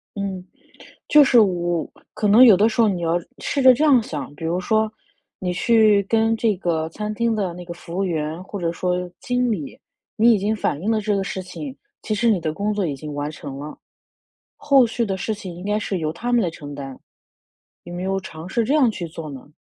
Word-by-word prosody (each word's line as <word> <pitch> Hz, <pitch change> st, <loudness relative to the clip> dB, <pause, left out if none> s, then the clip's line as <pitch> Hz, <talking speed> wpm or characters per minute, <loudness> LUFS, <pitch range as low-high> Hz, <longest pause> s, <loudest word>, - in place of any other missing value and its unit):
嗯， 195 Hz, -2 st, -4 dB, 0.7 s
就 300 Hz, -, +7 dB
是 260 Hz, -3 st, +5 dB
我 175 Hz, -5 st, 0 dB, 0.2 s
可 210 Hz, -, -2 dB
能 215 Hz, +5 st, +8 dB
有 220 Hz, -6 st, +8 dB
的 210 Hz, +4 st, +4 dB
时 230 Hz, -, -1 dB
候 225 Hz, -, +5 dB
你 180 Hz, -4 st, -2 dB
要 165 Hz, 0 st, +1 dB, 0.2 s
试 280 Hz, -, -1 dB
着 260 Hz, 0 st, +9 dB
这 290 Hz, +5 st, +1 dB
样 270 Hz, -6 st, +5 dB
想， 145 Hz, -8 st, -6 dB
比 155 Hz, -, -9 dB
如 170 Hz, +2 st, 0 dB
说 220 Hz, +3 st, +1 dB, 0.5 s
你 180 Hz, -1 st, -2 dB
去 215 Hz, +1 st, +4 dB
跟 225 Hz, 0 st, +2 dB
这 220 Hz, -3 st, +1 dB
个 165 Hz, -3 st, -1 dB
餐 210 Hz, +5 st, -5 dB
厅 235 Hz, +1 st, 0 dB
的 195 Hz, -4 st, -1 dB
那 180 Hz, 0 st, -9 dB
个 175 Hz, -, -7 dB
服 170 Hz, 0 st, -9 dB
务 195 Hz, -, 0 dB
员 160 Hz, -1 st, -3 dB
或 195 Hz, +1 st, -7 dB
者 170 Hz, -1 st, -1 dB
说 180 Hz, +1 st, -2 dB
经 250 Hz, 0 st, 0 dB
理， 165 Hz, -11 st, -4 dB, 0.4 s
你 235 Hz, +2 st, +5 dB
已 -, -, +1 dB
经 205 Hz, +3 st, 0 dB
反 155 Hz, -8 st, -2 dB
映 210 Hz, -, 0 dB
了 220 Hz, -1 st, +1 dB
这 210 Hz, 0 st, 0 dB
个 195 Hz, -, 0 dB
事 195 Hz, 0 st, -4 dB
情， 265 Hz, +9 st, -8 dB, 0.3 s
其 215 Hz, -, -2 dB
实 235 Hz, +3 st, +2 dB
你 205 Hz, -5 st, +3 dB
的 155 Hz, -1 st, -2 dB
工 205 Hz, +6 st, -2 dB
作 205 Hz, -2 st, -1 dB
已 145 Hz, -5 st, -2 dB
经 150 Hz, +2 st, -7 dB
完 145 Hz, +1 st, -3 dB
成 145 Hz, -3 st, -8 dB
了， 150 Hz, +1 st, -8 dB, 0.8 s
后 275 Hz, -4 st, +4 dB
续 230 Hz, +1 st, -1 dB
的 195 Hz, -3 st, -2 dB
事 215 Hz, +4 st, -2 dB
情 190 Hz, -4 st, -8 dB
应 175 Hz, -, -10 dB
该 210 Hz, +1 st, 0 dB
是 200 Hz, -3 st, -3 dB
由 155 Hz, -2 st, -2 dB
他 235 Hz, +10 st, -4 dB
们 240 Hz, -1 st, +4 dB
来 180 Hz, -, 0 dB
承 145 Hz, -3 st, -9 dB
担。 135 Hz, -2 st, -8 dB, 0.9 s
有 175 Hz, -, -9 dB
没 175 Hz, +1 st, -5 dB
有 195 Hz, 0 st, -1 dB
尝 165 Hz, -3 st, -9 dB
试 230 Hz, +5 st, 0 dB
这 265 Hz, -, 0 dB
样 285 Hz, -6 st, +4 dB
去 190 Hz, -5 st, -5 dB
做 160 Hz, -1 st, -8 dB
呢？ 140 Hz, 0 st, -10 dB
195 Hz, 255 characters per minute, -22 LUFS, 170-220 Hz, 0.9 s, 着